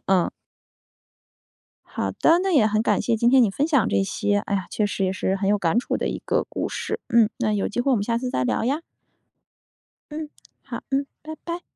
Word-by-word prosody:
嗯。 185 -2 +3 1.6
好 - - -3
的， 330 - +4
那 385 - 0
也 250 -10 +5
很 215 +1 +1
感 - - +2
谢 230 -2 +1
今 235 +2 +3
天 260 -1 +6
你 215 - +3
分 280 +10 0
享 285 -9 +2
这 100 0 +2
些。 205 - 0
哎 205 0 -3
呀， 190 -2 -1
确 210 - 0
实 195 -1 -2
也 185 - 0
是 190 0 -1
很 195 0 -1
有 205 0 +3
感 180 +3 +1
触 245 - -1
的 - - -2
一 - - -3
个 - - +1
故 - - -3
事。 440 +1 -4
嗯， 230 -3 +4
那 215 - +1
有 205 -2 0
机 230 +3 -2
会 275 - +1
我 255 - +4
们 200 - -1
下 230 +1 0
次 250 0 -3
再 130 - 0
聊 - - 0
呀。 280 +6 0 1.3
嗯， 305 0 -5 0.3
好， - - -7
嗯， 275 +1 +1 0.2
拜 315 +1 -7
拜。 345 +1 -4
225 Hz, 240 characters per minute, -24 LUFS, 200-275 Hz, 1.6 s, 天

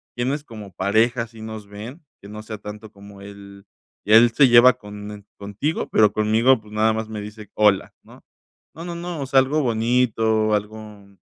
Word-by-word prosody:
quiénes 135 +5 -3
como 105 -6 -11
pareja 110 +6 0
sí 110 -1 -15
nos 110 -2 -8
ven. 110 +10 -10 0.2
Que 100 - -13
no 105 +1 -8
sea 110 0 -8
tanto 105 +1 -10
como 100 0 -15
el 100 0 -13 0.4
él 115 +2 +6
se 135 +3 +4
lleva 120 +1 +7
con 105 -1 -10
e 105 -1 -12
contigo, 100 +10 -4
pero 105 -2 +3
conmigo, 110 +4 +2
pues, 105 0 -18
nada 110 +1 +1
más 110 0 -5
me 110 - -6
dice 105 0 -11
hola, 105 -3 +2
¿no? - - -18 0.5
No, 165 - -9
no, 175 -1 -6
no, 170 -2 -6
o - - -3
sea, 135 0 +3
algo 145 +4 -1
bonito, 115 -3 +1
algo 105 -1 -7
110 Hz, 185 wpm, -21 LUFS, 105-120 Hz, 0.5 s, lleva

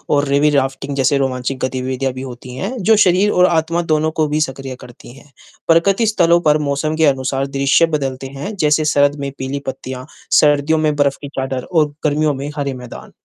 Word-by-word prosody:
और 145 0 +2
रिवी 140 +2 +3
राफ्टिंग 135 0 -1
जैसे 135 +1 +2
रोमांचक 130 -1 -2
गतिविधियाँ 130 0 -3
भी 130 - -7
होती 125 -1 -9
हैं 195 - -4
जो 220 +4 +5
शरीर 190 +3 +3
और 180 - +4
आत्मा 170 0 +1
दोनों 155 +1 +1
को 155 - +2
भी 150 +1 -1
सक्रिय 135 -2 -4
करती 120 0 -14
हैं। 140 +1 -18 0.4
प्रकृति 190 +7 +3
स्थलों 175 -5 +3
पर 150 - +4
मौसम 155 +3 -1
के 160 0 +3
अनुसार 135 -1 0
दृश्य 140 +4 +4
बदलते 135 -2 -4
हैं 195 +10 -5
जैसे 150 0 +2
सर्द 145 -1 +3
में 140 0 -4
पीली 135 +2 -4
पत्तियाँ, 130 -1 -6 0.3
सर्दियों 150 +1 +3
में 155 -1 +1
बर्फ 140 -1 +1
की 145 - -6
चादर 130 -1 -4
और 155 -4 +2
गर्मियों 150 0 +1
में 140 +2 -5
हरे 140 -2 -2
मैदान। 125 -1 -10
140 Hz, 195 wpm, -17 LUFS, 135-155 Hz, 0.4 s, जो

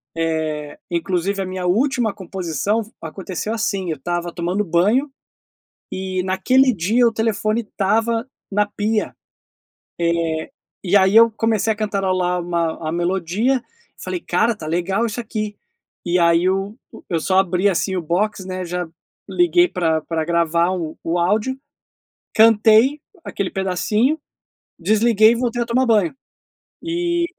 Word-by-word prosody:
eh, 155 -2 -2
inclusive 180 +3 -1
a - - -2
minha 185 0 -4
última 240 +2 +1
composição 190 +1 -2 0.2
aconteceu 185 +5 -5
assim, 200 -5 -2
eu 155 - -3
estava 175 +4 -3
tomando 180 +4 -1
banho 210 - +2 0.8
e 185 -1 -2
naquele 255 +8 +3
dia 220 +6 +2
o 230 - +2
telefone 220 0 0
estava 225 +3 0 0.2
na 210 +1 +2
pia, 210 +1 -2 0.9
eh, 170 -2 -1 0.3
e 195 +1 +2
aí 190 0 +4
eu 230 +1 +7
comecei 225 -1 0
a 220 - 0
cantarolar 185 -4 0
uma 170 -2 -2
a - - 0
melodia 185 +9 0 0.4
falei: 365 - -4
"Cara, 230 -7 +1
tá 160 - -8
legal 180 +7 0
isso 230 +1 -3
aqui." 215 -2 -4 0.5
E 175 +1 +2
aí 170 +1 +4
o 195 +2 -1 0.4
eu 165 -2 0
só 185 +3 +2
abri, 185 +1 +1
assim, 190 0 0
o - - 0
box, 190 +4 -1
né, 185 0 -4
já 180 0 -4 0.4
liguei 350 0 +3
pra 165 - 0
pra 160 0 -2
gravar 170 +1 +1
o 170 -4 -4
o 170 +2 0
áudio, 215 +9 0 0.8
cantei 225 +5 +5 0.2
aquele 200 -2 -3
pedacinho, 210 - 0 0.6
desliguei 220 +3 +4
e - - +1
voltei 240 0 -1
a - - 0
tomar 245 +2 +1
banho, 210 -7 +2 0.7
e 345 +1 0
195 Hz, 140 wpm, -20 LUFS, 175-225 Hz, 0.9 s, eu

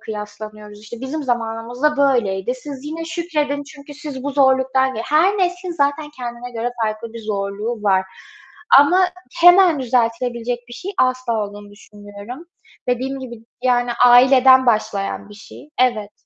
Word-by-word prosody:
kıyaslanıyoruz. 210 0 -9
İşte, 220 +2 -10
"Bizim 280 +4 -4
zamanımızda 240 +3 -1
böyleydi. 245 -6 +1
Siz 270 +1 -9
yine 320 +2 -5
şükredin 310 -4 -2
çünkü 290 0 -13
siz 285 -3 -7
bu 285 - -1
zorluktan" 265 -1 +2
Her 360 +7 +2
neslin 360 0 -1
zaten 295 -1 -1
kendine 245 -2 -7
göre 235 0 -3
farklı 220 +1 -3
bir 230 - -8
zorluğu 210 +2 -4
var 190 -2 +2 0.7
ama 290 +6 +5 0.4
hemen 355 -3 +6
düzeltilebilecek 240 0 -1
bir - - -12
şey 385 +9 -6
asla 255 -3 +1
olduğunu 205 0 -11
düşünmüyorum. 205 +7 -12 0.4
Dediğim 260 +2 -1
gibi, 235 -3 -10 0.2
yani, 245 -1 +1 0.2
aileden 260 +1 +6
başlayan 205 -4 -1
bir 210 - -13
şey. 210 +8 -14
Evet. 220 -5 +1
250 Hz, 135 wpm, -19 LUFS, 220-285 Hz, 0.7 s, hemen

